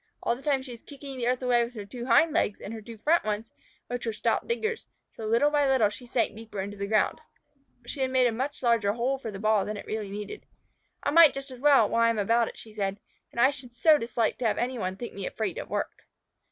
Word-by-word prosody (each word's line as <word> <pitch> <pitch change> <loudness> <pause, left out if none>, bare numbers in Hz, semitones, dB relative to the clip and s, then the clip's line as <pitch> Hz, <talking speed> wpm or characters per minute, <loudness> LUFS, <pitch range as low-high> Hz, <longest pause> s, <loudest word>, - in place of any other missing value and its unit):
All - - +1
the 255 - -12
time 275 -2 +1
she 260 - -9
was 235 -1 -10
kicking 280 -1 -9
the 240 -2 -2
earth 255 +1 0
away 245 -1 +3
with 240 +1 -7
her 210 -2 -6
two 240 +4 -7
hind 290 +6 +5
legs 205 - +1
and 215 - -7
her 225 - -7
two 230 +1 -10
front 320 +10 +2
ones, 215 +1 -3 0.3
which 245 -1 -4
were 225 - -1
stout 210 - 0
diggers, 465 -1 -2 0.3
so - - -10
that 215 - -3
little 240 +6 +3
by 290 -1 +3
little 235 -6 +3
she 245 +3 -10
sank 235 - 0
deeper 220 -2 -8
into 200 +2 -4
the 200 0 -4
ground. 215 0 +1 0.6
She 265 +1 -2
made 260 -1 +3
a 240 - +3
much 265 +5 -4
larger 230 -4 +3
hole 255 +4 -1
for 230 - -5
the 200 - -6
ball 215 0 +2
than 210 0 -4
it - - -8
really 215 -2 -4
needed. 210 - -7 0.6
"I - - +1
might 330 -2 +7
just 275 0 -6
as 255 - -10
well, 275 -5 +5
while 230 - +1
I 230 - +5
am 230 - 0
about 230 +3 +2
it," - - -9
she 220 - -11
said. 200 -1 -2 0.3
"And - - -6
I 260 +3 +6
should 250 -3 -10
so 310 +3 +5
dislike 230 -2 -1
to 245 - +1
have 215 - 0
any 250 0 -1
one 185 -1 -2
think 240 +4 -7
me 195 -1 -4
afraid 225 - -3
of - - -7
work." - - -4
235 Hz, 265 wpm, -27 LUFS, 215-265 Hz, 0.6 s, might